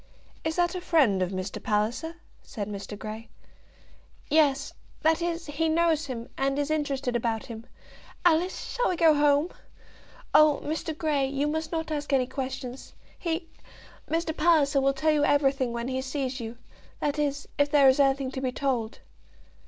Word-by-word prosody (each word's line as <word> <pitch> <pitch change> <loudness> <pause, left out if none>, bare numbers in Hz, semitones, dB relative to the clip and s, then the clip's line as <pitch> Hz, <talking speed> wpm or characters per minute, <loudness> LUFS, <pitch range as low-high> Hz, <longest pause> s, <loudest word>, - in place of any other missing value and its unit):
"Is 320 0 -1
that 350 0 +2
a 365 - -4
friend 275 - +3
of 180 - +1
Mr. 185 0 -5
Palliser?" 225 +11 -1 0.3
said 205 -2 -6
Mr. 205 0 -6
Grey. 220 +2 -7 1.0
"Yes; 285 -3 +3 0.3
that 320 +2 +3
is, 335 0 -2
he 315 +2 -1
knows 320 -2 +2
him, 235 -3 -5
and 275 +1 +1
is 290 +1 -1
interested 275 -5 -1
about 230 -2 -1
him. 230 -1 -9 0.6
Alice, 350 +2 +2
shall - - +1
we 365 - 0
go 325 -2 +5
home? 290 +3 +3 0.8
Oh! 305 -1 +6
Mr. 315 +1 -3
Grey, 295 -4 +1
you 280 +2 -1
must 315 +1 -2
not 320 -1 -3
ask 295 -1 -3
any 260 -2 +3
questions. 265 -1 -6 0.2
He, 335 0 -2 0.6
Mr. 325 -1 -1
Palliser, 300 -4 +3
will 275 +1 +3
tell 310 +3 +2
you 300 -1 +2
everything 275 -3 +2
when 235 +1 -3
he 260 0 -2
sees 265 -1 -3
you, 230 0 -6 0.4
that 295 0 -1
is, 285 -1 -1
if 285 0 +4
there 285 -2 +6
is 265 +1 +5
anything 270 -1 +2
to 260 - -5
be 260 -1 -1
told." 250 -5 -2
285 Hz, 170 wpm, -27 LUFS, 255-315 Hz, 1.0 s, Oh